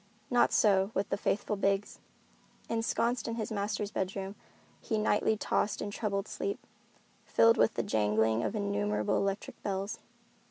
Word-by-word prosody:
Not 245 - +4
so 195 -2 +4
with 195 +1 0
the - - +1
faithful 205 +1 -1
Biggs. 195 0 0 0.7
Ensconced 230 +1 0
in 230 - -2
his 225 -1 -4
master's 205 0 -2
bedroom, 195 0 -3 0.5
he 220 - -2
nightly 215 +1 +2
tossed 210 - 0
in 205 - -3
troubled 200 -2 -2
sleep, 405 - -4 0.6
filled 230 0 +4
with 225 - +3
the - - 0
jangling 110 +1 +2
of 200 - -2
innumerable 205 0 0
electric 195 0 -2
bells. 200 +2 -3
205 Hz, 145 wpm, -31 LUFS, 195-220 Hz, 0.7 s, Not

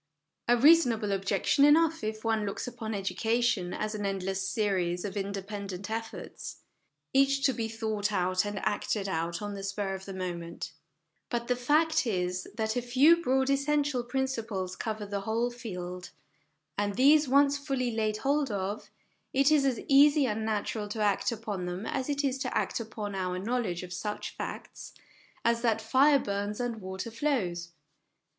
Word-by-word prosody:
A 240 +1 +5
reasonable 245 -7 +5
objection 195 +7 +2
enough, 320 +2 +5
if 215 0 -3
one 225 -2 +1
looks 200 -1 -3
upon 225 -3 -5
edu 195 -1 -3
cation 225 -5 +1
as 215 0 -3
an 210 -1 -4
endless 195 -1 -2
series 185 -4 0
of 200 -1 -5
independent 200 0 -4
efforts, 225 0 -6 0.5
each 275 0 +3
to 265 - +4
be 225 -2 -2
thought 220 -2 -2
out 185 -1 +1
and 205 -1 -4
acted 205 -1 -1
out 170 +1 -2
on 205 0 -4
the 200 - -6
spur 195 0 -2
of 190 0 -6
the 195 - -7
moment; 170 -2 -5 0.6
but 235 -1 -2
the 250 - +2
fact 295 +3 +2
is, 180 -3 -1
that 220 0 -1
a 245 - +1
few 275 +8 +5
broad 265 -2 +2
essential 280 -1 +1
principles 230 -8 -2
cover 215 -2 -4
the 200 0 -3
whole 230 +4 0
field, 180 -6 -6 0.7
and 205 -1 0
these 290 +4 +5
once 280 +1 +4
fully 270 -4 -1
laid 215 -1 0
hold 280 +2 +1
of, 200 0 -3 0.4
it 275 +2 +4
is 295 -3 +4
as 260 -3 +1
easy. 285 +1 +6
and 220 -2 -1
natural 215 0 -2
to 210 +2 -5
act 205 +1 +2
upon 210 -5 -4
them 180 +4 -4
as 265 +3 -2
it 285 0 0
is 270 -1 0
to 255 -2 -1
act - - -1
upon 215 -2 -5
our 185 -1 -2
knowledge 200 -3 -2
of 180 0 -7
such 210 +3 -4
facts - - -7 0.5
as 235 0 +3
that 230 -2 +2
fire 265 +6 +5
burns 205 -2 -3
and 240 -3 -3
water 190 +4 -5
flows. 190 -10 -1
220 Hz, 170 wpm, -29 LUFS, 195-260 Hz, 0.7 s, easy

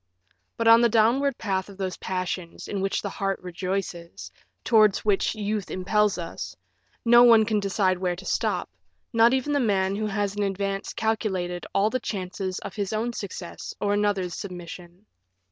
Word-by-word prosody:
But 230 - 0
on 230 +1 +8
the 235 - +4
downward 240 +5 +3
path 190 -2 -2
of 195 - -12
those 190 -2 -3
passions 185 -2 -4
in 200 -2 -3
which 195 0 -1
the - - -2
heart 195 -2 -2
rejoices, 180 -1 -4 0.3
towards 215 -4 +4
which 205 +1 +2
youth 210 -1 -2
impels 205 +2 +1
us, 170 -2 -6 0.5
no 240 +1 +7
one 230 -3 +7
can 215 -1 +1
decide 195 -2 +1
where 180 -1 0
to 190 +2 -11
stop, - - 0 0.5
not 230 +1 +6
even 265 +3 -1
the 285 - +2
man 195 -5 +1
who 215 +1 -1
has 205 -1 -1
in 205 - -2
advance 195 0 -2
calculated 190 -6 -2
all 205 +2 +3
the 255 - 0
chances 185 -2 -4
of - - -7
his 200 -1 -2
own 230 +3 -1
success 185 -5 -7
or 205 0 +1
another's 205 -4 0
submission. 175 +1 -8
200 Hz, 170 wpm, -25 LUFS, 185-220 Hz, 0.5 s, on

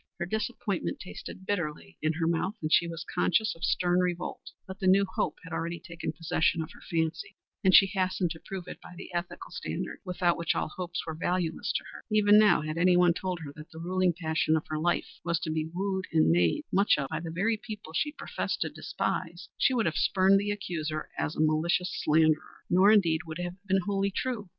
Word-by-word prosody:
Her 175 - -2
disappointment 215 -1 -2
tasted 190 0 -9
bitterly 150 - -3
in 155 +1 +1
her 165 +1 -1
mouth, 170 +5 0
and 155 0 -1
she 170 - +5
was 165 0 -6
conscious 220 +5 +2
of 165 - -13
stern 180 0 +2
revolt; 180 -1 -2 0.2
but 190 +1 -9
the 190 - 0
new 195 +2 +5
hope 185 - -2
had 165 - -9
already 170 +1 -3
taken 170 0 -5
possession 165 0 0
of 160 - -10
her - - -15
fancy, 165 0 -2 0.3
and 190 - +5
she 195 - +9
hastened 185 -2 0
to 160 - -6
prove 190 0 -7
it - - -9
by 180 - -12
the 180 - -9
ethical 175 +1 -4
standard - - -4
without 180 -2 +1
which 170 - 0
all - - -1
hopes 175 +1 -5
were 160 - -4
valueless 170 0 -1
to - - -1
her. - - -11
Even 210 0 +6
now 210 -5 +5
had 155 +1 -3
anyone 180 0 +5
told 180 -1 -3
her 145 -3 -7
that 155 +2 -11
the 160 - -13
ruling 180 +2 +1
passion 160 -1 +1
of 155 - -4
her 155 0 -2
life 175 +2 -1
was 170 -1 0
to 155 - -2
be 155 0 -2
wooed 190 +1 -2
and 160 - +4
made 85 -1 +2
much 200 -2 +4
of 140 -2 -2
by - - -2
the 165 - -6
very 200 +8 +1
people 210 -7 -9
she 295 - 0
professed - - -4
to - - 0
despise, - - -3
she - - +3
would 230 - +2
have 165 - +1
spurned 195 +1 +4
the 205 +1 -2
accuser 160 -6 -3
as 150 - -2
a - - -6
malicious 165 +4 +1
slanderer. 155 0 +2
Nor 190 +4 +6
indeed 170 -7 +4
would 160 0 -5
it 180 - -3
have 180 +3 -7
been 190 0 +3
wholly 200 -1 +1
true. 210 -1 -3
175 Hz, 220 wpm, -29 LUFS, 160-190 Hz, 0.3 s, she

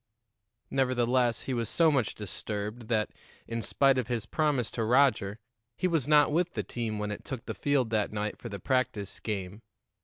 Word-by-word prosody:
Nevertheless, 125 -2 +2
he 135 - -3
was 115 -3 -1
so 165 -2 +4
much 130 -7 +1
disturbed 105 +2 -5
that, 110 -2 +1 0.4
in 115 0 -3
spite 135 +4 +3
of 120 - -2
his 115 -3 -2
promise 140 -1 0
to 115 - -2
Roger, 120 -4 +3 0.4
he 185 - +1
was 165 -7 +1
not 150 -1 +5
with 175 +3 +1
the - - -1
team 115 -3 -3
when 105 0 -2
it 105 - -6
took 130 -2 -6
the - - -3
field 135 -5 +1
that 105 -2 +1
night 105 0 -2
for 120 - -7
the 100 - -5
practice 120 -5 -1
game. 100 -1 -4
120 Hz, 185 wpm, -29 LUFS, 105-135 Hz, 0.4 s, not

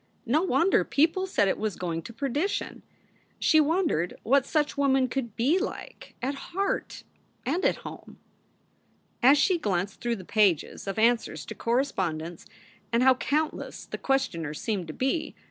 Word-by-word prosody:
No 285 +7 +2
wonder 370 0 +3
people 330 +6 +1
said 205 - +2
it - - 0
was 215 -4 -2
going 170 -2 -3
to 170 - -9
perdition. 280 - -2 0.6
She 315 - +4
wondered 305 - +1
what 275 +2 +3
such 300 -2 0
women 270 -2 +3
could 235 -3 -4
be 285 +11 +2
like 400 - -6
at 270 +2 0
heart 385 +7 -3 0.4
and 325 +9 0
at - - +3
home. - - -9 1.0
As 270 +4 +7
she 345 +4 +3
glanced 195 - -2
through 240 -1 0
the 190 -4 -10
pages 200 -4 +1
of 195 - -3
answers 225 -9 +1
to - - -6
cor 235 +1 -1
respondents 175 - -2 0.4
and 235 +1 +3
how 260 0 +7
countless 300 +5 -2
the - - -7
questioners 170 - -1
seemed 200 -6 -2
to 155 - -6
be! 290 - -1
255 Hz, 160 wpm, -27 LUFS, 200-295 Hz, 1.0 s, As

